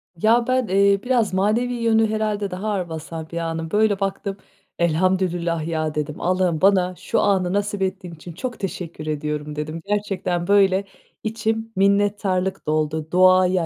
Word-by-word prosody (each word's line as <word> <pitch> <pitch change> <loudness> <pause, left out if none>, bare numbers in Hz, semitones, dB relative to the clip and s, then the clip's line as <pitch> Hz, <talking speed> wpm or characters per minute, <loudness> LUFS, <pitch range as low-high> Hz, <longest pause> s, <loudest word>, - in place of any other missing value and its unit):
Ya, 230 +7 +3
ben, 255 -2 +1
eee, 200 +1 +3
biraz 245 -6 +1
manevi 220 +6 +1
yönü 225 -2 +2
herhâlde 210 -2 -1
daha 185 +4 -4
ağır 185 -4 -2
basar 160 0 -7
bir 170 - -5
anım 165 -1 -3
Böyle 210 -1 +2
baktım, 195 0 -3 0.4
"Elhamdülillah 170 -1 +1
ya" 155 -2 -2
dedim. 150 0 -3
"Allah'ım 180 -3 +1
bana 185 -2 +3
şu - - -1
anı 190 -3 +1
nasip 205 0 -1
ettiğin 185 -2 -3
için 165 +2 -10
çok 245 +5 -5
teşekkür 170 -5 -5
ediyorum" 150 0 -3
dedim. 155 +2 -5
Gerçekten, 195 -4 -1
böyle, 195 -1 +4 0.4
içim 225 0 -2
minnettarlık 195 -1 +1
doldu. 155 0 -1
Doğaya, 185 -1 +4
185 Hz, 150 wpm, -22 LUFS, 165-205 Hz, 0.4 s, böyle